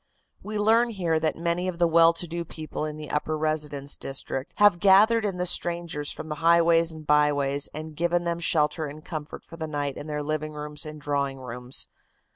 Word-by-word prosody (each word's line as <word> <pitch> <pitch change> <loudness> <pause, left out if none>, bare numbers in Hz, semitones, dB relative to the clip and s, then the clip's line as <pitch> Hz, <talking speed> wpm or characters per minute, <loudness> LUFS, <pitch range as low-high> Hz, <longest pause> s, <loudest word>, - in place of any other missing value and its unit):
"We 215 0 -4
learn 225 +3 +3
here 175 -7 0
that 155 -1 0
many 170 +2 -1
of 180 -2 -3
the 175 - +3
well 165 0 +6
to 170 +1 -4
do 170 +1 -4
people 155 -1 -6
in 155 0 -5
the 150 -1 -8
upper 155 +1 -1
residence 150 -2 -2
district 135 0 +1
have 205 -4 +5
gathered 210 +4 +5
in 195 -3 -2
the 180 - -1
strangers 170 -4 -1
from - - -7
the 155 - -3
highways 165 0 +4
and 155 -1 -10
byways 145 -1 +2
and 155 0 -8
given 175 +2 0
them 170 0 -2
shelter 155 -1 +1
and 150 +2 -10
comfort 155 -2 -7
for 165 - -12
the 160 -1 -4
night 145 -2 -3
in 145 - -7
their 150 -1 -3
living 155 +1 -3
rooms 150 0 -5
and 155 0 -8
drawing 140 -2 -2
rooms. 125 0 -4
155 Hz, 205 wpm, -26 LUFS, 150-170 Hz, -, well